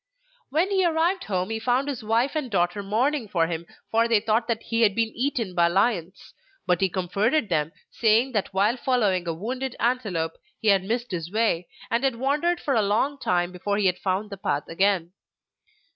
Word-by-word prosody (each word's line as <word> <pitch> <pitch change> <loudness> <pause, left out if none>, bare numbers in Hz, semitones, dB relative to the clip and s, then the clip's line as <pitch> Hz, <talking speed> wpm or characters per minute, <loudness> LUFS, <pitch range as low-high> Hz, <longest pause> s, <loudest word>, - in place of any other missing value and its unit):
When 325 +8 +1
he 380 -1 +3
arrived 345 +2 +1
home 185 0 -2
he 225 - -2
found 250 +4 +1
his 275 -6 -4
wife 230 +5 +1
and 300 -5 -2
daughter 175 -1 0
mourning 235 +6 0
for 170 -4 +1
him, 170 0 -4 0.2
for 230 +1 +3
they 230 -2 +4
thought 220 +2 0
that 230 -2 -2
he 230 0 -1
had 205 -4 +4
been 225 -1 0
eaten 240 -6 -1
by 170 -1 +4
lions; 185 -1 -1 0.3
but 180 0 +1
he 190 - +3
comforted 200 - 0
them, 155 -2 0 0.2
saying 230 +3 +3
that 210 -5 -1
while 205 +6 +2
following 210 -9 +1
a 165 - 0
wounded 255 +8 -4
antelope 205 -10 -1 0.2
he 220 - +1
had 195 -2 +4
missed 235 +4 -2
his 170 -1 -4
way 210 -6 +1 0.2
and 235 +3 +1
had 265 -3 +1
wandered 295 +8 0
for 280 - -1
a 225 - +3
long 225 +8 0
time 175 -4 0
before 200 +3 -2
he 205 - +1
had 180 -1 +2
found 195 +2 -2
the 200 - -6
path 195 +2 -2
again. 185 -1 +1
215 Hz, 200 wpm, -25 LUFS, 185-250 Hz, 0.3 s, they